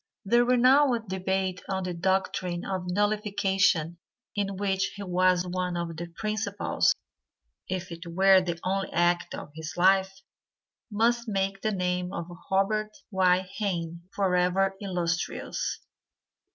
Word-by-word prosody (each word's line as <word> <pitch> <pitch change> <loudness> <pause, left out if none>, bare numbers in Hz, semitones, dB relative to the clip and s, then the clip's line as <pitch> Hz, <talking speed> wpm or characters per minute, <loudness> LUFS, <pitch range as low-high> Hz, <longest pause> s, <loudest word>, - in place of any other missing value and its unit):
The 235 +4 +4
renowned 250 -2 +4
debate 190 0 -1
on 190 -1 -1
the 180 -1 -3
doctrine 180 0 -1
of 190 -2 -3
nullification 195 -4 +1 0.4
in 200 -1 -1
which 195 -1 0
he 200 - -6
was 185 -1 +2
one 180 0 -2
of 170 -1 -3
the 170 +2 -5
principals, 215 -1 0 0.7
if 185 -1 -3
it 170 +1 -8
were 190 +2 +5
the 170 -2 -3
only 195 +1 -1
act 175 0 +1
of - - -8
his 160 0 -7
life, 190 +1 +4 0.8
must 235 +3 +1
make 195 -1 -1
the 215 - 0
name 180 -2 -1
of 170 - -4 0.2
Robert 215 +2 0
Y. 185 -1 +4 0.2
Hayne 170 -5 -2
forever 190 0 +1
illustrious. 175 -3 -2
190 Hz, 125 wpm, -27 LUFS, 180-200 Hz, 0.8 s, were